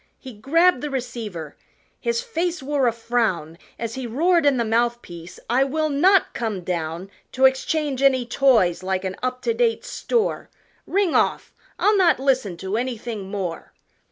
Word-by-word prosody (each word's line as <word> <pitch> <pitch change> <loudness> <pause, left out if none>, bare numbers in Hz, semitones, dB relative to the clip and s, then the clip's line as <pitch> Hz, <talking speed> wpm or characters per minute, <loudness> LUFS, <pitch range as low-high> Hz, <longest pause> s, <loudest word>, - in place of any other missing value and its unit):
He 260 -2 -11
grabbed 300 +7 +2
the 295 - -3
receiver 225 - -5 0.4
his 470 0 -1
face 355 - -2
wore 275 -2 +1
a - - +3
frown 220 -9 -2 0.2
As 230 -1 -4
he 260 -1 -5
roared 330 +6 +2
in 275 -2 +3
the 235 - 0
mouth 235 +2 0
piece, 170 0 -11
"I 250 +3 +3
will 310 +3 -1
not 355 +7 +3
come 220 -5 -3
down 170 +1 -4 0.2
To 260 +1 +3
exchange 270 +1 +1
any 260 -3 +3
toys 230 -9 +3
like 190 0 -2
an 190 0 -3
up 255 0 -3
to 465 - +1
date 465 -1 0
store, 465 -3 -1 0.4
Ring 390 -3 +1
off, - - +1 0.2
I'll 420 0 +3
not 360 -7 +4
listen 260 -9 0
to 190 +4 -3
anything 230 -5 -4
more!" 190 -5 -5
250 Hz, 165 wpm, -22 LUFS, 205-295 Hz, 0.4 s, not